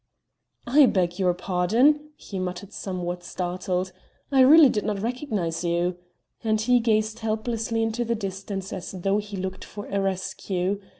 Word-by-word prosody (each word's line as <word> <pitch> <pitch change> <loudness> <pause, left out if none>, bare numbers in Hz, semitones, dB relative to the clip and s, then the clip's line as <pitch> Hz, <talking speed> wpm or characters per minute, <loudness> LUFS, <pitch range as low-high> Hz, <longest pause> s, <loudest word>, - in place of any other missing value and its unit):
"I 275 +3 +6
beg 180 -4 0
your 180 -2 +2
pardon," 230 +13 +2
he 195 - -7
muttered 185 +2 -5
somewhat 180 -2 -4
startled, 180 +1 -2 0.4
"I 270 - +3
really 290 +4 +9
did 210 -5 0
not 210 -2 -1
recognize 215 - -2
you," 175 +1 0 0.5
and 215 -1 +1
he 245 +3 +4
gazed 220 -1 +1
helplessly 225 +1 -1
into 225 +2 -1
the 235 0 -1
distance 195 -1 -5
as 180 - -6
though 195 +2 0
he 205 -1 -6
looked 185 0 -4
for 205 0 -8
a 200 0 0
rescue. 190 0 -2
200 Hz, 155 wpm, -25 LUFS, 185-225 Hz, 0.5 s, really